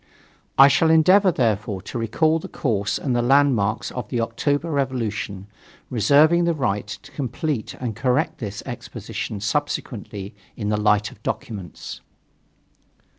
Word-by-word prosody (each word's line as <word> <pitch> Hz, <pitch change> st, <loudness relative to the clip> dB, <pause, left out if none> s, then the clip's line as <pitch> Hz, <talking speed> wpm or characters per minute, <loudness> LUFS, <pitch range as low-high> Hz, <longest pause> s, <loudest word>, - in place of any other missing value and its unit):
I 135 Hz, -, +10 dB
shall 160 Hz, +3 st, +3 dB
endeavor, 185 Hz, +5 st, +6 dB
therefore, 105 Hz, -, 0 dB
to 120 Hz, -, -5 dB
recall 155 Hz, +9 st, +2 dB
the -, -, -8 dB
course 105 Hz, -6 st, -1 dB
and 130 Hz, -4 st, -1 dB
the 120 Hz, -, +2 dB
landmarks 120 Hz, -5 st, +2 dB
of 125 Hz, -4 st, -6 dB
the 120 Hz, -, -1 dB
October 145 Hz, +8 st, -1 dB
revolution, 115 Hz, -8 st, -2 dB, 0.5 s
reserving 145 Hz, -, +4 dB
the 170 Hz, -1 st, +1 dB
right 105 Hz, -8 st, -1 dB, 0.2 s
to -, -, -14 dB
complete 135 Hz, -1 st, -3 dB
and 120 Hz, -4 st, -4 dB
correct 145 Hz, +7 st, 0 dB
this 105 Hz, -3 st, -5 dB
exposition 105 Hz, -, -6 dB
subsequently 105 Hz, -4 st, -3 dB, 0.2 s
in 105 Hz, -2 st, -2 dB
the 105 Hz, -, +1 dB
light 105 Hz, 0 st, +2 dB
of 105 Hz, -, -17 dB
documents. 100 Hz, -7 st, -6 dB
120 Hz, 135 wpm, -23 LUFS, 105-145 Hz, 0.5 s, I